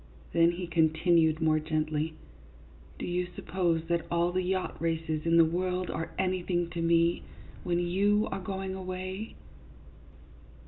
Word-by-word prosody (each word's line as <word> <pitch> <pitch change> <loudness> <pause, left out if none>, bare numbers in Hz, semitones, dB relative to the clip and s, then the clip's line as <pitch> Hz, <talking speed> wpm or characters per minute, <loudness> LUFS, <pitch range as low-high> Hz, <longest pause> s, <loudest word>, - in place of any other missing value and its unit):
Then 170 0 +4
he 180 +1 -4
continued 160 -1 +3
more 155 -1 +3
gently, 155 0 -1 0.4
" 70 +2 -23
Do - - -5
you 180 0 -1
suppose 170 -4 0
that 170 0 -1
all 170 +1 +1
the 185 +1 0
yacht 185 -1 -2
races 160 -1 -1
in 165 0 +4
the 165 - +7
world 180 +2 -1
are 160 +1 -3
anything 180 -2 0
to 170 - -3
me, 170 0 +3 0.4
when 175 -1 0
you 200 +4 +2
are - - -2
going 190 0 -4
away 185 +2 -5
170 Hz, 145 wpm, -29 LUFS, 160-185 Hz, 0.4 s, the